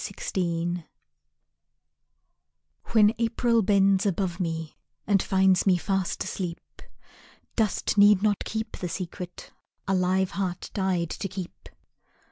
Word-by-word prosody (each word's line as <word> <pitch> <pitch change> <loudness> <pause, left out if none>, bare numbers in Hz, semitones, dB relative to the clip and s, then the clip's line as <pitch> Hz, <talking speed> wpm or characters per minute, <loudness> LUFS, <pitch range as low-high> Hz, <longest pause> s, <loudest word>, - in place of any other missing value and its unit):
"I - - -5
Love - - -5
You" 175 -1 -1 2.0
When 215 -1 +4
April 230 0 +2
bends 195 -1 +3
above 185 -1 -1
me 165 -3 -3 0.3
And 200 -2 +3
finds 190 0 +3
me 185 -2 +5
fast 190 0 -1
asleep, 175 -3 -4 1.0
Dust 215 -1 0
need 205 -1 +6
not 210 -2 +1
keep 220 +1 -4
the 180 - -4
secret 180 +1 -7 0.4
A 195 - +1
live 185 0 +1
heart 185 -2 -3
died 185 -4 0
to 200 - -4
keep. 185 -1 -8
190 Hz, 120 wpm, -26 LUFS, 180-205 Hz, 2.0 s, need